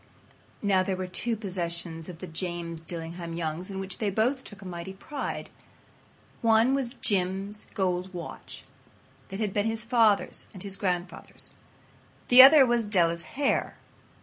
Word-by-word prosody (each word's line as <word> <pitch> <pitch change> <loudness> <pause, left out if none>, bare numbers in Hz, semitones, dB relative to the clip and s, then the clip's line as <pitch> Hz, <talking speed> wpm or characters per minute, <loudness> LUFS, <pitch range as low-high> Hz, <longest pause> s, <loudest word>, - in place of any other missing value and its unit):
Now, 195 -2 +4
there 185 0 -1
were 185 0 -3
two 205 +6 -1
possessions 170 -4 -3
of 175 - -8
the 185 - -7
James 170 -1 -5
Dillingham 165 0 -6
Youngs 165 +2 -3
in 195 -1 -5
which 190 -1 -5
they 210 - +1
both 245 +7 +1
took 200 -2 -11
a - - -8
mighty 175 +1 -6
pride. 275 +9 -5 0.9
One 225 +3 +4
was 270 -2 -1
Jim's 195 +1 -1
gold 185 -2 0
watch 175 -2 -8 0.7
that 195 +1 -6
had 210 -3 -1
been 205 +1 +1
his 225 0 -2
father's 225 -4 +2
and 185 - -8
his 195 -1 -5
grandfather's. 180 -2 -3 0.8
The 250 +1 +11
other 275 +1 +10
was 240 -3 +1
Della's 170 -1 0
hair. 280 -1 +1
190 Hz, 150 wpm, -28 LUFS, 175-220 Hz, 0.9 s, The